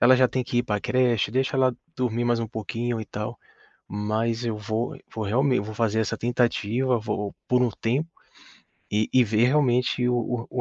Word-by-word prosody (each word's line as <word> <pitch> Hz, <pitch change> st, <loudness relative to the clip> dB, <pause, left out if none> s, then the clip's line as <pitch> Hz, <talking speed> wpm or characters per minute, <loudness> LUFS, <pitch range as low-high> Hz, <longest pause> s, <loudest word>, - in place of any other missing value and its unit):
ela 125 Hz, +2 st, +7 dB
já 130 Hz, 0 st, +5 dB
tem 130 Hz, 0 st, -1 dB
que 120 Hz, -, -1 dB
ir 120 Hz, -, +3 dB
pra 105 Hz, -4 st, -1 dB
creche, 120 Hz, -6 st, +2 dB
deixa 130 Hz, +1 st, +1 dB
ela 130 Hz, -2 st, +3 dB, 0.2 s
dormir 120 Hz, -2 st, 0 dB
mais 120 Hz, -1 st, +2 dB
um 115 Hz, -, -2 dB
pouquinho 115 Hz, +2 st, -3 dB
e 110 Hz, -, -5 dB
tal.", 105 Hz, +4 st, -5 dB, 0.5 s
mas 110 Hz, +3 st, -1 dB
eu 115 Hz, -2 st, -1 dB
vou 110 Hz, +2 st, -3 dB, 0.2 s
vou 110 Hz, -1 st, -3 dB
realme 125 Hz, +3 st, +2 dB
vou 110 Hz, +1 st, -6 dB
fazer 110 Hz, -1 st, +1 dB
essa 110 Hz, -, -1 dB
tentativa, 120 Hz, +1 st, +1 dB
vou 105 Hz, -2 st, -3 dB
por 125 Hz, 0 st, +3 dB
um 120 Hz, -, +2 dB
tempo 125 Hz, +9 st, -1 dB, 0.8 s
e 105 Hz, +1 st, +1 dB
e 130 Hz, -1 st, +5 dB
ver 110 Hz, +2 st, +2 dB
realmente 125 Hz, -3 st, +2 dB
o 125 Hz, -, +2 dB
o 120 Hz, 0 st, -2 dB
120 Hz, 190 wpm, -25 LUFS, 110-125 Hz, 0.8 s, ela